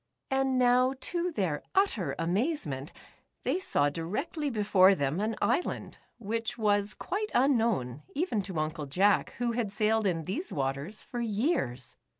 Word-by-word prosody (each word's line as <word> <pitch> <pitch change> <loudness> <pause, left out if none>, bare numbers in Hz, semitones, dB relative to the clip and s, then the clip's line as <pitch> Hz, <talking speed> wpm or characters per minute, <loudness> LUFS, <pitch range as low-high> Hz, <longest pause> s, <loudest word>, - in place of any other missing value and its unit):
And 265 -1 +2
now, 250 +1 +4
to 350 +5 -1
their 180 - -1
utter 380 - +1
amazement, 175 - -1 0.5
they 365 - 0
saw 145 - +1
directly 220 - -3
before 200 -4 +5
them 145 +2 -1
an 215 +2 -1
isl 255 +9 +2
and - - -11 0.2
which 230 +2 -2
was 205 -2 +2
quite 425 +2 -3
unknown, 225 - +2
even 285 - 0
to 190 -3 -6
Uncle 155 -1 -2
Jack 195 +8 +2
who 240 -1 0
had 230 -4 -2
sailed 215 0 +2
in 165 -4 -1
these 220 - -3
waters 140 +8 -3
for 245 - -6
years. 210 - -1
215 Hz, 150 wpm, -29 LUFS, 165-255 Hz, 0.5 s, before